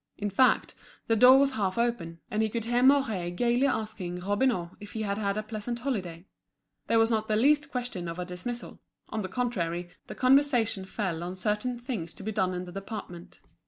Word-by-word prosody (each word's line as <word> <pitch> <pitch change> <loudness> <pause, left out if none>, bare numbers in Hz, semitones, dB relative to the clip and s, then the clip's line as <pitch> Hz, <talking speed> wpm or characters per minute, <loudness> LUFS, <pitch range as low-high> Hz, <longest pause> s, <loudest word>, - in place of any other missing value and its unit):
In 205 -1 -2
fact, 255 +5 +3 0.3
the 225 - +2
door 250 +4 +8
was 275 0 +4
half 200 -6 -1
open, 225 -9 -1
and 215 - +1
he 220 - +1
could 230 0 -3
hear 240 +1 +1
Mouret 255 -10 +3
gaily 245 +5 +2
asking 215 -8 -3
Robineau 205 -2 0
if 205 - -10
he 220 - -3
had 200 0 -2
had 200 -1 -1
a 215 - -1
pleasant 215 +2 -4
holiday; 190 -10 -4 0.6
there 230 - +3
was 225 +1 +4
not 220 -1 0
the 215 - +1
least 290 +5 +3
question 245 -10 -4
of 165 +1 -5
a 180 - -3
dismissal—on 220 +3 -7
the 190 - -4
contrary, 175 -8 -2 0.2
the - - -7
conversation 255 -7 +3
fell 190 -4 -3
on 180 +2 -4
certain 210 +6 -1
things 235 - -5
to - - -10
be 220 - -2
done 185 -3 0
in 180 0 -4
the 175 - -9
department. 195 -3 -8
215 Hz, 195 wpm, -28 LUFS, 185-245 Hz, 0.6 s, door